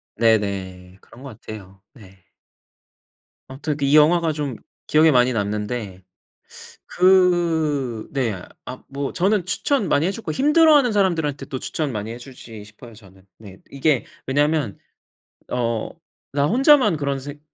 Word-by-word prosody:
네네. 95 -5 -1
그런 125 - -17
것 120 -5 -11
같아요. 95 -3 -11
네. 95 -6 -18 1.2
암튼 145 +3 -4
이 140 +2 +3
영화가 165 +2 +4
좀 145 -4 -4 0.3
기억에 155 +2 +4
많이 125 -1 +3
남는데. 105 -2 -4 0.8
그 165 - +1
네. 115 -9 -2 0.2
아 130 - -9
뭐 140 0 -4
저는 195 +1 +1
추천 200 +4 -1
많이 155 +3 +2
해줬고 200 +4 -4
힘들어하는 295 -3 +4
사람들한테 160 -9 0
또 130 - -5
추천 150 0 -4
많이 105 +1 -5
해주지 120 -3 -11
싶어요 110 +3 -15
저는. 95 -2 -19
네. 100 -4 -13
이게 140 -1 0 0.2
왜냐면 145 -4 0 0.7
어 115 -2 -2 0.4
나 140 0 +1
혼자만 255 - +4
그런 140 -2 -2
생 145 +2 -9
135 Hz, 255 characters per minute, -21 LUFS, 110-160 Hz, 1.2 s, 영화가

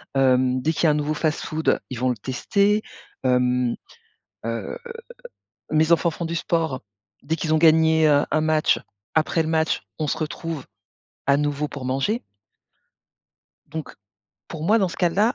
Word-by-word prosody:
Hem, 130 -1 +3
dès 160 - +1
qu'il 165 - 0
y - - +6
a - - +5
un - - +2
nouveau 150 +1 0
fast-food 155 0 0
ils 125 -2 -5
vont 130 0 +1
le - - -2
tester. 200 - +1 0.4
Hem, 125 -1 +2 0.7
heu, 115 - -4 0.9
mes 155 +1 +2
enfants 170 0 +4
font 165 +1 -5
du 165 - -3
sport, 160 -5 -1 0.4
dès 160 +4 -1
qu'ils 155 0 -1
ont 155 - +4
gagné, 160 -1 +5
heu, 145 -1 +4
un 155 - +2
match 155 -1 +2 0.3
après 160 +1 +2
le 160 - -3
match, 160 0 +1 0.2
on 155 - 0
se - - -1
retrouve 160 -1 -4 0.6
à 140 0 +4
nouveau 145 0 -1
pour 140 -3 -8
manger. 135 - 0 1.4
Donc, 160 -1 -7 0.5
pour 160 -2 -7
moi 220 +5 +4
dans 190 -3 +2
ce - - -8
cas-là, 195 +7 +2
155 Hz, 165 wpm, -23 LUFS, 135-165 Hz, 1.4 s, y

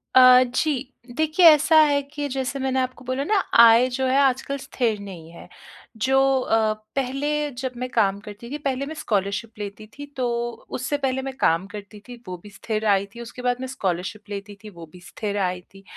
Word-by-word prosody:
अ, 255 0 +8
जी 260 +1 -1 0.3
देखिए 315 +3 +3
ऐसा 310 +1 +4
है 285 -2 +3
कि 290 +1 -5
जैसे 270 +1 -3
मैंने 265 0 0
आपको 255 0 -4
बोला 255 +2 -2
ना 425 - 0 0.2
आय 235 +2 +8
जो 265 +1 -2
है 260 +1 +2
आजकल 270 +1 +1
स्थिर 235 -5 -2
नहीं 180 -5 -10
है। 170 - -13 0.5
जो 265 +5 +1 0.2
अ, 220 -2 +1 0.2
पहले 275 +2 -1 0.3
जब 260 -1 -3
मैं 255 +1 -4
काम 200 -5 +1
करती 210 +3 -10
थी, 295 - -3
पहले 275 -2 -2
मैं 315 - -6
स्कॉलरशिप 205 -1 -2
लेती 205 +1 -7
थी, 290 - -7
तो 265 -3 -3 0.4
उससे 275 +4 -2
पहले 265 -2 -1
मैं 270 0 -5
काम 165 +4 +2
करती 205 0 -10
थी, 245 - -9
वो 180 -1 -5
भी 205 - -11
स्थिर 215 +1 -4
आय 200 -1 +3
थी, 235 - -8
उसके 245 +1 -9
बाद 245 0 0
मैं 260 - -4
स्कॉलरशिप 205 -3 -4
लेती 205 0 -7
थी, 215 - -9
वो 170 -4 -11
भी 180 - -14
स्थिर 205 -2 -4
आय 180 0 -4
थी, 195 0 -15
245 Hz, 205 wpm, -23 LUFS, 205-270 Hz, 0.5 s, अ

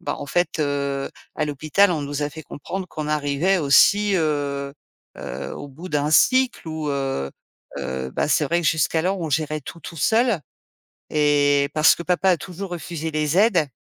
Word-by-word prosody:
bah, - - -3
en 145 - -6
fait, 175 +3 0
heu, 140 -1 -1 0.3
à 155 - 0
l'hôpital, 155 +7 +2
on 155 -3 -2
nous 145 +1 -3
a 145 - -2
fait 160 +1 -9
comprendre 185 +7 -6
qu'on 155 -2 -5
arrivait 150 +5 +1
aussi, 200 +7 +4
heu, 145 -3 -1 0.5
heu, - - -6
au - - -7
bout 160 +7 -10
d'un 150 -2 0
cycle 255 +3 +3
où, 155 -1 -4
heu, 135 - -2 0.5
heu, 65 0 -4
bah, - - -1
c'est 155 - +3
vrai 170 +5 +1
que - - -1
jusqu'alors, 165 +4 +1
on 165 - -3
gérait 155 +1 -1
tout, 165 +4 -10
tout 165 - -9
seul. 225 - +2 0.7
Et 145 -1 +3
parce 155 0 +6
que - - -7
papa 180 +2 +1
a 180 - +4
toujours 185 +3 -7
refusé 165 -2 -5
les 155 +2 0
aides. 190 -8 +3
155 Hz, 180 wpm, -22 LUFS, 145-175 Hz, 0.7 s, parce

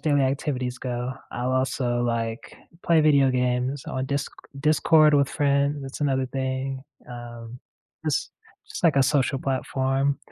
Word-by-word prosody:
daily 145 -3 +2
activities 130 -2 -1
go, 125 0 -3 0.2
I'll 125 +2 -2
also, 130 -2 0
like, 115 -1 -3 0.3
play 165 -2 +4
video 140 -3 +4
games 125 +2 0
on 130 0 -3
Disc 140 0 -2 0.3
Discord 155 0 +5
with 140 -1 +3
friends, 140 0 +1
that's 135 +2 -8
another 135 -2 +1
thing, 130 0 -3 0.3
um, 120 0 -9 0.5
just - - -1 0.4
just, - - -6
like 160 -4 +4
a 135 - +6
social 135 -1 +1
platform, 135 +1 0
135 Hz, 140 wpm, -25 LUFS, 125-140 Hz, 0.5 s, a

